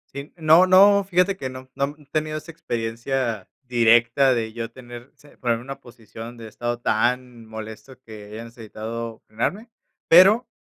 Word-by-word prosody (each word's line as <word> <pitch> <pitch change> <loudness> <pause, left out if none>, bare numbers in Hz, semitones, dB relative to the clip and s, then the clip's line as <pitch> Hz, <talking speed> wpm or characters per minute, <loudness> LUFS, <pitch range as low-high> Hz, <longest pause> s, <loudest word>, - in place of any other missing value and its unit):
Sí, 140 +1 -7
no 160 +3 +5
no, 200 +2 +6
fíjate 190 +1 +1
que 130 - -5
no, 130 0 -11
no 140 +2 -2
he 150 - -20
tenido 155 0 -2
esa 165 - -9
experiencia 115 - -3
directa 120 +2 +3
de 110 -2 -3
yo 115 -1 -5
tener 120 +1 -12
se 145 - -21
ponerme 120 -2 -1
una 135 +2 -8
posición 115 0 -11
de 115 - -9
estado 120 +2 -4
tan 120 0 -1
molesto 110 +4 -10
que 110 -4 -12
hayan 110 +3 -9
necesitado 115 0 -8
frenarme, 195 - -4 0.4
pero, 195 +8 +6
120 Hz, 160 wpm, -23 LUFS, 115-150 Hz, 0.4 s, no